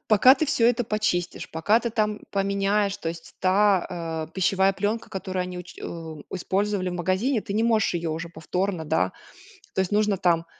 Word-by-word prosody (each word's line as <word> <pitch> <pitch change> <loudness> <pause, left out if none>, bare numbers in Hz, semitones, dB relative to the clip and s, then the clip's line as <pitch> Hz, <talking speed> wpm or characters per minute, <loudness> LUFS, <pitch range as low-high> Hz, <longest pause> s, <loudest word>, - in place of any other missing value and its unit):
пока 240 +5 +7
ты 305 +3 -1
всё 240 -6 +3
это 245 0 +2
почистишь, 210 -5 -1
пока 205 +8 +2
ты 235 - -2
там 210 -1 0
поменяешь, 200 +1 +1
то 165 - -4
есть 165 0 -8
та, 180 -4 +1
э, - - -27
пищевая 190 +1 +2
пленка, 205 +4 -2
которую 190 -1 -3
они 180 0 -6
уч 180 0 -10
у 160 -3 -7
использовали 190 +1 0
в - - -4
магазине, 185 +8 +1
ты 200 -1 -6
не 220 +2 +1
можешь 225 -5 +2
ее 170 -1 -1
уже 165 +2 -4
повторно, 170 +2 -2
да. 90 - +1 0.6
То - - 0
есть, 190 - -2
нужно 210 -1 +2
там, 170 -2 +2
190 Hz, 185 wpm, -25 LUFS, 175-210 Hz, 0.6 s, пока